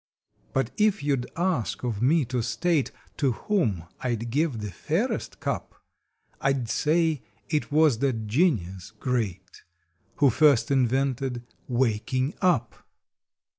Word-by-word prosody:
But 135 -2 0
if 210 -4 +2
you 145 -1 +2
d 125 -1 -5
ask 175 - -1
of 115 -4 -2
me 145 +4 +3
to 125 0 -1
state 130 +6 +1 0.3
To 135 -4 +2
whom 115 - 0 0.2
I 125 -2 0
d 115 +1 -5
give 140 +2 0
the 105 -2 -5
fairest - - -2
cup - - -3 0.7
I 135 - +3
d 130 -3 -2
say 160 0 +2 0.3
it 150 -2 -1
was 150 -6 +4
that 125 -5 0
genius 105 - 0
great 110 -4 -3 0.5
Who 140 -3 +4
first 140 -3 +4
invented 130 -1 +1 0.2
WAKING 130 +2 0
UP! 130 -11 +2
130 Hz, 135 wpm, -26 LUFS, 115-150 Hz, 0.7 s, was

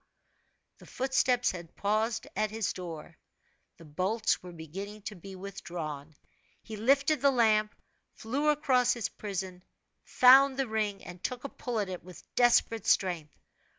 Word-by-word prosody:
The - - -15
footsteps 255 -1 +1
had 175 -2 -10
paused 220 +2 0
at 215 - 0
his 215 -1 -2
door. 165 -3 -8 0.6
The 165 - -14
bolts 190 +9 0
were 180 - -10
beginning 195 +6 -8
to 210 - -6
be 190 +2 -10
withdrawn. 165 -6 -7 0.5
He 220 - -8
lifted 275 +6 +2
the 280 - +5
lamp, 215 -4 +2 0.4
flew 280 +7 -1
across 265 -5 +3
his 235 -3 -3
prison, 190 -3 -6 0.4
found 265 +1 +6
the 270 -1 0
ring, 215 -2 -2
and 175 0 -10
took 250 -1 -3
a 280 - -5
pull 245 -3 -4
at 205 - -1
it 185 -1 -6
with 180 -1 -13
desperate 235 -3 +3
strength. 170 -6 +1
210 Hz, 150 wpm, -30 LUFS, 180-245 Hz, 0.6 s, found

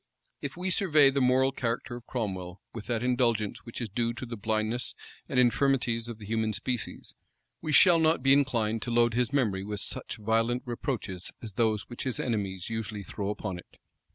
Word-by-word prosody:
If 140 +2 -5
we 185 +1 -1
survey 155 -8 +5
the 135 0 0
moral 130 +1 +4
character 120 -1 -2
of 120 - -10
Cromwell 95 -6 -4
with 115 -3 -7
that 120 -1 -1
indulgence 120 -4 +1
which 115 - -6
is 120 - -2
due 115 +3 -1
to 120 +2 -6
the 120 -1 -6
blindness 110 +2 -1 0.3
and - - +2
infirmities 120 -2 +2
of 120 -2 -6
the 105 - -10
human 110 0 0
species, 125 -1 -4 0.5
we 155 - -2
shall 170 +2 +7
not 160 -3 +3
be 135 0 +6
inclined 115 -6 +2
to - - -4
load 120 0 +3
his 125 +1 +1
memory 110 -9 +1
with 105 0 -4
such - - -3
violent 115 +3 +1
reproaches 120 - -4
as 110 -3 -7
those 110 -1 +1
which 120 - -8
his 130 -4 -2
enemies 100 -6 -2
usually 110 -2 -4
throw 100 0 -4
upon 100 -3 -4
it. - - -16
115 Hz, 190 wpm, -29 LUFS, 110-125 Hz, 0.5 s, shall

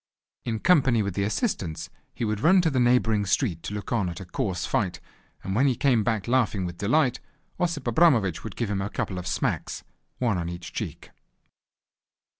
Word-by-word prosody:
In 115 -2 -1
company 130 -7 +4
with 100 -2 -3
the 100 - -1
assistants 90 - -2 0.2
he 120 - -3
would 105 -1 -1
run 180 - +5
to 165 -2 +1
the 130 - +1
neighbouring 115 -4 +3
street 95 - 0
to - - -6
look 105 - -6
on 100 -6 +1
at 85 - -6
a 95 - -8
coarse 90 0 -2
fight, 95 -4 -1 0.4
and 95 - -3
when 130 +7 +3
he 130 - +2
came 120 -4 +2
back 110 -2 -1
laughing 115 -6 +1
with 85 -1 -6
delight, 125 +5 +2 0.4
Osip 165 -6 -1
Abramovich 120 - +3
would 110 -4 -7
give 115 -4 -2
him 95 -1 -1
a 100 - -2
couple 95 -2 -3
of 90 - -6
smacks, 85 - -2 0.3
one 115 -7 +1
on 85 0 -3
each 85 -1 -8
cheek. - - -6
110 Hz, 195 wpm, -26 LUFS, 95-125 Hz, 0.4 s, run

